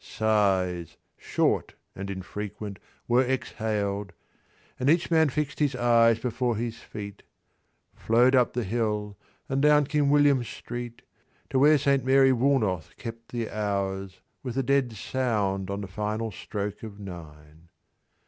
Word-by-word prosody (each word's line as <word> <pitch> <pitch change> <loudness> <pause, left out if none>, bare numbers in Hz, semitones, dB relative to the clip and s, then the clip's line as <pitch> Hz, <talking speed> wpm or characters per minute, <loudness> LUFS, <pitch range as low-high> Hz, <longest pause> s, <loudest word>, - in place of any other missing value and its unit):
Sighs, 95 -6 0 0.2
short - - 0 0.2
and 100 0 -6
infrequent, 100 +1 -6 0.3
were 120 +2 +4
exhaled, 105 -6 -2 0.7
And 130 +2 +2
each 170 +2 +2
man 160 -2 +4
fixed 140 0 -3
his 145 -3 +1
eyes 115 -2 +4
before 120 0 -1
his 115 +1 -4
feet. 100 -1 -8 0.7
Flowed 120 +3 +3
up 125 -2 +3
the 120 - -1
hill 105 -1 -2 0.3
and 135 +1 0
down 150 0 +5
King 145 0 +1
William 145 -3 +4
Street, 120 +1 -7 0.5
To 130 - +2
where 150 +2 +6
Saint 140 -1 +2
Mary 135 +1 +5
Woolnoth 115 - +1
kept 115 -1 -8
the 120 -2 -3
hours 100 -2 -3 0.2
With 125 -1 -5
a 135 - +2
dead 135 -2 +1
sound 105 -5 -1
on 100 +1 -3
the 100 - -5
final 105 +3 -3
stroke 105 +1 -5
of 105 -2 -9
nine. 80 -4 -11
115 Hz, 140 wpm, -27 LUFS, 100-130 Hz, 0.7 s, where